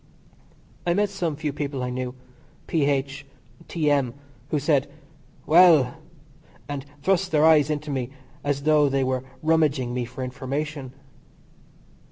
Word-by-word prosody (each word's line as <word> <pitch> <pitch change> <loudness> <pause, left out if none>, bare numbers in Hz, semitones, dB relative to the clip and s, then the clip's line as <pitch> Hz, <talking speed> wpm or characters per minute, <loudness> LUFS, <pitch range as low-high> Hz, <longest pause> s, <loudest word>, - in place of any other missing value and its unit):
I 175 0 +1
met 205 0 +1
some 175 -6 -2
few 150 -1 -3
people 140 -2 -3
I 125 - -2
knew. 125 0 -4 0.5
P.H., 140 -2 0 0.4
T.M., 145 -6 +1 0.3
who 150 - +1
said: 145 -1 +1 0.6
"Well!" 160 -6 +6 0.7
and 145 -1 -5 0.2
thrust 190 +2 +2
their 155 -2 +3
eyes 155 -2 +5
into 150 0 -3
me 130 -3 -2 0.3
as 140 -1 -1
though 150 -1 +4
they 135 0 +1
were 130 -1 -1 0.2
rummaging 150 -6 +2
me 125 -1 -2
for 130 +2 -7
information. 135 +2 -4
145 Hz, 130 wpm, -24 LUFS, 130-155 Hz, 0.7 s, Well